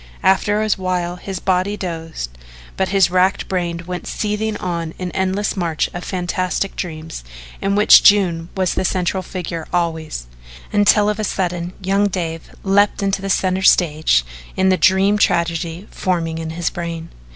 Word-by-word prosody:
After 205 +3 +3
a 215 - -1
while 180 -1 -2
his 190 +1 -6
body 190 +2 0
dozed 165 - -5 0.4
but 190 - 0
his 195 -3 +3
racked 185 +1 +2
brain 170 -2 -2
went 180 0 -5
seething 210 0 -2
on 170 -2 -4
in 180 -1 -4
an - - -10
endless 190 +2 -1
march 170 -5 -1
of 175 - -5
fantastic 185 +1 -2
dreams 160 - -6 0.4
in 200 0 +1
which 210 +1 +8
June 175 -5 +4
was 185 -1 +1
the - - -1
central 185 0 0
figure 170 -3 -5
always, 160 - -2 0.5
until 205 0 +4
of 210 0 -1
a - - -1
sudden 180 -3 -2
young 195 +2 +2
Dave 165 -4 -4
leaped 200 +1 +2
into 195 0 0
the 195 - -4
centre 185 0 +1
of 190 - -1
the - - +10
stage 155 - +2 0.3
in 190 0 +3
the 185 - +4
dream 190 +4 +3
tragedy 170 +1 0
forming 165 -3 -1
in 160 -1 -4
his 165 +1 -2
brain. 170 -1 -5
185 Hz, 170 wpm, -19 LUFS, 170-195 Hz, 0.5 s, the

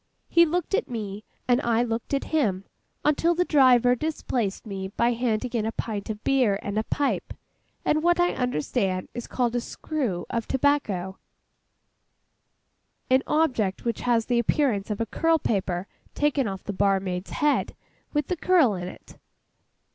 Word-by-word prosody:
He 340 0 +5
looked 350 +3 -2
at 430 - +1
me, 210 -3 -5 0.2
and 245 +1 +3
I 235 -1 +2
looked 235 +3 -2
at 275 - -1
him, 205 -12 +1 0.4
until 330 +3 +3
the 360 +1 +2
driver 250 -5 +5
displaced 250 -8 -2
me 195 -3 -4
by 235 +5 +1
handing 240 0 -1
in 230 -3 0
a 220 - -1
pint 215 -3 -4
of 215 0 -5
beer, 250 -7 +3
a 210 +2 -1
pipe, 285 -1 -1 0.5
and 310 - +2
what 345 +1 +3
I 350 0 +3
understand 185 - -1
is 240 - -6
called 245 -2 -1
'a 245 - +1
screw' 235 - -3
of 230 -1 -2
tobacco—an 250 -10 +1 2.1
object 250 -13 +1
which 235 - -1
has 235 -2 +2
the 240 -1 +1
appearance 235 -4 +1
of 210 - -2
a - - +1
curl 325 +8 +2
paper 190 - -1 0.3
taken 290 -4 +1
off 195 -1 -5
the 205 - -4
barmaid's 195 -2 0
head, 295 -1 0 0.4
with 295 -2 0
the 360 - -2
curl 330 - +4
in 180 -1 -4
it. - - -12
235 Hz, 155 wpm, -25 LUFS, 200-290 Hz, 2.1 s, He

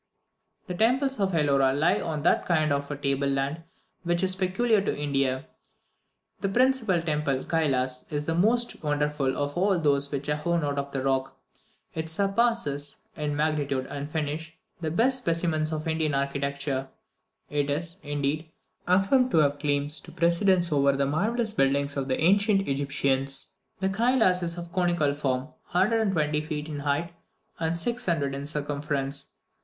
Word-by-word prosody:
The 180 - -5
temples 255 +7 +1
of 195 -1 +1
Elora 140 -4 +3
lie 170 +5 +2
on 155 -3 -3
that - - +2
kind 155 -4 +2
of 140 0 -2
table 140 0 0
land 140 +3 -1 0.4
which 175 +1 0
is 185 0 +1
peculiar 195 +4 +2
to 195 - -2
India. 135 -2 0 0.9
The 195 - -1
principal 230 -6 +2
temple, 150 -4 0
Kylas, 130 -6 -1
is 150 0 -2
the 165 - 0
most 230 +8 +1
wonderful 150 -2 0
of 145 0 -2
all 190 +1 +2
those 140 -3 +1
which 140 0 -3
are 150 0 +1
hewn 170 +2 0
out 145 -1 -1
of 140 0 -4
the 135 -1 -3
rock. 135 -1 -1 0.6
It 160 0 -3
surpasses, 195 -7 +1 0.2
in 150 -1 -2
magnitude 145 -3 0
and 145 +1 -5
finish, 160 +1 -4 0.2
the 160 -2 -2
best 250 +10 +2
specimens 165 -5 0
of 155 0 -3
Indian 160 -2 0
architecture; 140 0 -2 0.6
it 145 -1 0
is, 170 +5 -3
indeed, 145 +2 -2 0.4
affirmed 195 +8 +4
to - - +1
have 145 -2 +3
claims 145 0 -1
to - - -12
precedence 170 +1 +2
over 140 -1 +3
the 140 0 +1
marvellous 215 - 0
buildings 140 0 +1
of 135 -1 -2
the 130 - -1
ancient 195 +3 +3
Egyptians. 135 -1 0 0.3
The 190 0 +1
Kylas 220 -3 +3
is 170 0 -2
of 170 0 -7
conical 175 -5 +1
form, 135 -1 -2 0.2
120 185 -6 +2
feet 150 -1 -4
in 145 -2 -4
height 145 +4 -1 0.5
and 165 0 0
600 170 - +1
in 140 +1 -4
circumference. 145 -1 -1
150 Hz, 155 wpm, -27 LUFS, 140-180 Hz, 0.9 s, affirmed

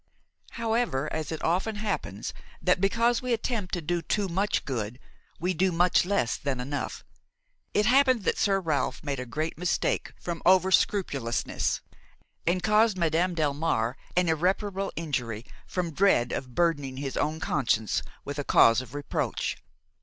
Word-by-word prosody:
However, 225 - 0
as 160 0 -3
it 160 - -5
often 185 +6 +1
happens 200 - -3 0.3
that, 180 0 +2
because 230 +4 +2
we 250 -1 0
attempt 225 -4 -2
to 175 - -4
do 170 +2 0
too 200 +5 0
much 195 +4 0
good, 120 -3 -3 0.4
we 180 +3 0
do 185 +2 +2
much 175 +1 +3
less 180 -11 +1
than 140 -3 -2
enough, 140 +3 -4 0.7
it 210 - +4
happened 255 -2 +4
that - - 0
Sir 195 -1 +3
Ralph 165 -3 -1
made 140 -3 -2
a 125 - -5
great 155 +6 -3
mistake 180 0 0
from 170 -1 -4
over 190 0 +5
scrupulousness 140 - +1 0.7
and 180 +1 +1
caused 210 0 +4
Madame 170 +1 +1
Delmare 145 -6 0 0.2
an 180 -1 +4
irreparable 190 +4 0
injury 125 -8 -3 0.2
from 175 -3 -2
dread 180 -10 +3
of 125 -2 -5
burdening 145 -6 +1
his 135 -1 -4
own 155 +1 0
conscience 115 -9 +1 0.2
with 145 +1 -4
a - - -1
cause 115 -3 +5
of 130 +2 -11
reproach. 145 -1 -2
170 Hz, 155 wpm, -27 LUFS, 140-195 Hz, 0.7 s, over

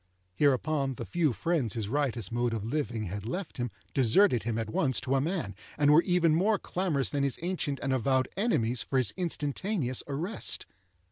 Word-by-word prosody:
Hereupon, 140 - +1
the - - -6
few 165 -5 +1
friends 125 - -1
his 110 -3 -2
riotous 120 -6 -1
mode 120 0 0
of 105 -2 -4
living 115 -4 -2
had 100 +1 -5
left 180 - -5
him 120 -1 -2 0.2
deserted 130 - +4
him 115 +2 -2
at 110 -1 -3
once 130 -1 +2
to 130 0 -1
a 135 - +3
man, 160 - -2 0.2
and 145 0 +4
were 160 - +7
even 175 -3 +2
more 200 +6 +3
clamorous 175 -9 -1
than 145 - 0
his 140 -2 +1
ancient 165 -6 -1
and 135 -1 0
avowed 130 0 +1
enemies 125 - +1
for 135 - -2
his 130 -4 +2
instantaneous 160 - -1
arrest. 160 +10 -2
140 Hz, 185 wpm, -29 LUFS, 120-165 Hz, 0.2 s, were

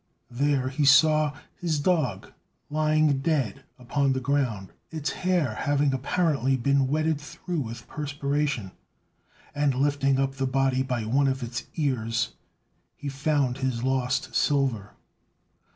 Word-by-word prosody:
There 135 +1 +1
he 135 +3 -1
saw 150 +2 +5 0.3
his 165 -4 0
dog 145 - 0 0.4
lying 155 -2 +2
dead 135 - -1
upon 135 +2 0
the 130 - -1
ground, 125 -8 -1 0.2
its 155 -2 -3
hair 180 -10 0
having 145 +3 +1
apparently 135 -1 +1
been 140 +1 +2
wetted 155 +1 0
through 170 +3 -5
with 115 -3 -6
perspiration; 145 -6 -2 0.8
and, 145 -2 +1
lifting 140 0 +2
up 135 0 -1
the 135 0 0
body 135 0 +1
by 125 -4 -2
one 135 +5 +2
of 135 -1 -1
its 120 -1 -5
ears, 120 -6 -1 0.6
he 145 - -5
found 135 -2 0
his 130 -3 -1
lost 130 0 0
silver. 130 -8 +1
135 Hz, 130 wpm, -26 LUFS, 130-145 Hz, 0.8 s, saw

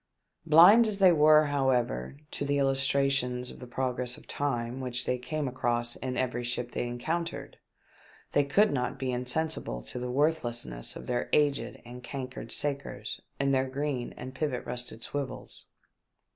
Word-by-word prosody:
Blind 180 +9 +8
as 210 -2 -1
they 190 -2 +6
were, 155 -1 +6
however, 130 - 0
to - - -4
those 145 0 0
illustrations 135 -2 +1
of - - -13
the 125 - -9
progress 125 0 -2
of - - -16
time 125 -2 -2
which 125 -1 -1
they 125 - -1
came 150 +3 -3
across 120 -2 0
in 130 -1 -4
every 120 -1 -1
ship 120 0 -3
they 120 - -2
encountered, 160 +8 -4 0.7
they 145 - +3
could 205 +10 +3
not 125 -2 -2
be 130 -1 -2
insensible 125 - -2
to - - -7
the 125 0 -4
worthlessness 120 - -1
of - - -8
their 120 -1 -2
aged 145 -2 +1
and 125 +1 -10
cankered 130 -3 -6
sakers 140 -1 +1 0.2
and 140 0 +2
their 130 0 +1
green 135 -2 -3
and 130 +1 -7
pivot 130 -2 -2
rusted 120 -2 -4
swivels. 140 -2 -6
130 Hz, 160 wpm, -29 LUFS, 125-145 Hz, 0.7 s, Blind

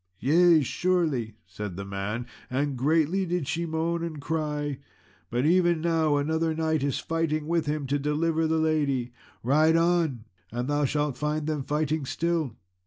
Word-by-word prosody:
"Yea, 165 +3 +5
surely," 150 - 0
said 95 +1 -6
the 100 - -5
man, 100 +4 -3 0.2
"and 140 +2 -1
greatly 160 +7 +2
did 175 -5 -2
she 165 +4 -1
moan 165 +1 -1
and 160 -3 -4
cry; 150 -2 -2 0.5
but 120 +3 0
even 175 0 +3
now 160 -2 +2
another 160 +2 0
knight 160 -1 0
is 140 -1 0
fighting 160 -2 -1
with 165 -2 0
him 150 -1 -1
to 140 +2 0
deliver 160 +3 +1
the 160 0 +1
lady; 145 -6 0 0.3
ride 155 +6 +4
on 165 -8 +1 0.3
and 120 +2 -3
thou 145 0 +1
shalt 145 0 -1
find 150 0 -1
them 155 -2 -1
fighting 150 +2 -1
still." 160 -3 -1
155 Hz, 160 wpm, -27 LUFS, 140-165 Hz, 0.5 s, Yea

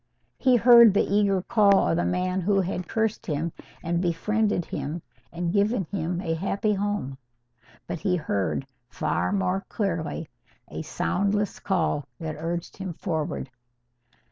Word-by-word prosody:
He 255 -2 +4
heard 235 -3 +8
the - - +4
eager 200 -3 +3
call 205 -4 +4
of 85 - +2
the 85 +1 +1
man 180 - 0
who 195 +2 +2
had 180 -1 -4
cured 220 -1 0
him 160 +1 -2 0.3
and 170 +1 0
befriended 190 +2 0
him 150 +4 -4 0.3
and 170 0 -2
given 205 +1 +2
him 175 -2 -2
a 165 -4 -1
happy 195 +5 0
home. 200 -10 -2 0.7
But 170 - -4
he 180 +3 +1
heard 135 - -1 0.2
far - - -1
more 195 -1 0
clearly 165 -6 -2 0.4
a - - -5
soundless 200 - -1
call 160 -6 0
that 160 -2 -4
urged 170 +2 -4
him 190 -2 -5
forward. 155 -6 -3
180 Hz, 140 wpm, -26 LUFS, 165-205 Hz, 0.7 s, heard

